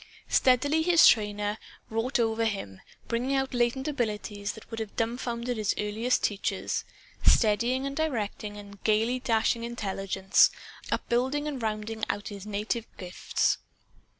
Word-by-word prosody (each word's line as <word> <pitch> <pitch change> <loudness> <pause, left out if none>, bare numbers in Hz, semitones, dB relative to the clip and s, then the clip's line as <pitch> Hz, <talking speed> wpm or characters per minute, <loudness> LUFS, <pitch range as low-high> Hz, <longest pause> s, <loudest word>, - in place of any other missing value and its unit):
Steadily 285 +5 +3
his 340 0 +6
trainer 210 -1 +3 0.3
wrought 225 +5 0
over 225 0 +1
him, 150 - -3 0.3
bringing 245 +4 0
out 265 -1 0
latent 245 +3 +1
abilities 210 -6 -2
that 220 - -13
would 225 - -4
have 220 -2 -5
dumfounded 235 +1 -2
his 210 -2 0
earliest 220 +4 0
teachers, 200 -1 -1 0.4
steadying 235 +5 +3
and 275 0 -3
directing 225 -9 -2
the 200 -1 -11
gayly 225 +4 +2
dashing 230 -1 +1
intelligence; 195 -4 +2 0.4
upbuilding 265 +5 0
and 280 -4 -4
rounding 220 0 -3
out 205 +1 -3
all - - -6
his 200 +1 -9
native 215 +3 -2
gifts. 180 -1 0
225 Hz, 135 wpm, -28 LUFS, 210-250 Hz, 0.4 s, his